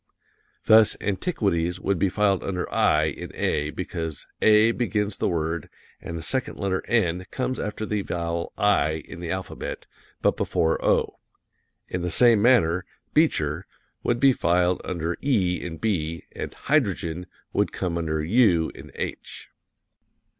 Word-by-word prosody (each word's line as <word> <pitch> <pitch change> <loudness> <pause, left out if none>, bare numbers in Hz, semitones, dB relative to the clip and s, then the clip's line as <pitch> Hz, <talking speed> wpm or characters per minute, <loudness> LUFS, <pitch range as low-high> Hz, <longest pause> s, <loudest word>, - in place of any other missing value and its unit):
Thus, 110 -1 +6
"Antiquities" 95 - -1
would 95 -1 0
be 95 - +2
filed 100 0 +1
under 90 -2 -2
i 75 0 +3
in 80 -2 -3
A, 75 0 0
because 80 -3 -5 0.2
A 110 +1 +6
begins 105 -4 -1
the - - 0
word, 80 -1 -2 0.3
and 85 - -6
the 80 - -5
second 130 -1 -2
letter, 95 -2 -1
n, 90 -6 +1
comes 130 -1 -2
after 105 +1 -3
the 105 -1 -1
vowel 85 -2 -3
i 80 -7 +2
in 85 - -9
the 85 -1 -5
alphabet, 95 +2 -5 0.4
but - - +3
before 80 0 0
o. - - +1 0.7
In 90 - -3
the 90 - -1
same 115 +3 +5
manner, 95 -8 +4 0.3
"Beecher" 85 - +1 0.3
would 120 - 0
be 135 0 +6
filed 90 -2 +2
under 85 -1 -3
e 95 -10 +1
in 80 -2 -5
B; 85 -6 -2
and - - -6
"Hydrogen" 90 - -1 0.3
would - - +1
come 90 -2 -2
under 80 -2 -1
u 90 -4 +3
in - - -12
H. - - -6
90 Hz, 145 wpm, -25 LUFS, 85-105 Hz, 0.7 s, Thus